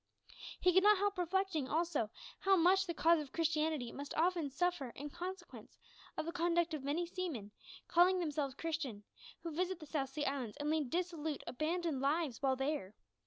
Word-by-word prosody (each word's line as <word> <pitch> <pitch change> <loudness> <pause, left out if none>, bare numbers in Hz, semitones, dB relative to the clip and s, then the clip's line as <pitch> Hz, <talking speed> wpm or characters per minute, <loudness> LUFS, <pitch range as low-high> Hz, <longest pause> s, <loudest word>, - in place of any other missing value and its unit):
He 365 -1 +4
could 375 - +7
not 420 +1 +6
help 405 0 0
reflecting, 355 -5 0
also, 320 -8 0 0.3
how 390 0 +4
much 380 +2 +4
the 340 - -1
cause 335 +1 +5
of 290 -3 -6
Christianity 310 -6 0
must 285 0 -6
often 335 -2 +2
suffer 290 -1 0
in 290 +1 -6
consequence 360 +2 -7 0.4
of - - -1
the 335 - -2
conduct 340 -1 +1
of 300 -3 -3
many 300 +5 0
seamen, 330 - -4 0.4
calling 360 +2 +5
themselves 295 -6 -1
Christians, 285 -12 -4 0.3
who 335 - -4
visit 365 +2 -1
the 310 - -9
South 285 -3 -2
Sea 290 +2 -3
Islands, 265 -6 -2
and 295 +1 -1
lead 310 -5 0
dissolute, 330 -2 -2
abandoned 315 0 -1
lives 285 -2 0
while 265 -2 +3
there. 270 -7 -2
320 Hz, 175 wpm, -36 LUFS, 280-355 Hz, 0.4 s, could